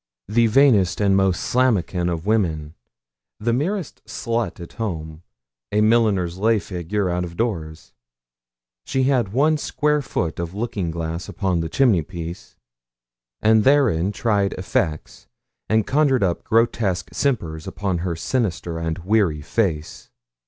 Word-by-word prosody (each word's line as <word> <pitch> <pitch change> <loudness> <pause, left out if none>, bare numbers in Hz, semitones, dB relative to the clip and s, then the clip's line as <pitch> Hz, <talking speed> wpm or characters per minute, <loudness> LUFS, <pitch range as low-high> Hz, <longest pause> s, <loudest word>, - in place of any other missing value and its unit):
The 115 +3 +3
vainest 110 -7 +4
and 100 -2 +3
most 95 -2 +2
slammakin 100 -8 +1
of 85 0 -4
women 80 -9 0 0.7
the 115 +2 0
merest 170 - -2
slut 115 -3 -2
at 85 - -9
home, 80 -7 -5 0.5
a 105 - +2
milliner's 105 -6 +2
lay 110 +2 +3
figure 95 0 -2
out 90 0 -1
of 85 -1 -8
doors 85 -9 -3 0.9
she 130 - 0
had 125 -7 +1
one 150 +7 +3
square 150 0 0
foot 85 - -3
of 85 +2 -4
looking 105 -5 -2
glass 80 +1 -4
upon 95 -4 -1
the 80 -1 -3
chimneypiece, 85 - -1 0.9
and 110 0 +5
therein 115 - +3
tried 105 -2 0
effects, 80 -4 -3 0.4
and 110 -1 +3
conjured 135 -4 +2
up 90 -3 0
grotesque 105 -6 +1
simpers 85 - -1
upon 95 -2 -2
her 85 -1 -2
sinister 90 -5 -2
and 80 0 -2
weary 95 -7 +2
face. 80 -5 -2
100 Hz, 130 wpm, -22 LUFS, 85-115 Hz, 0.9 s, and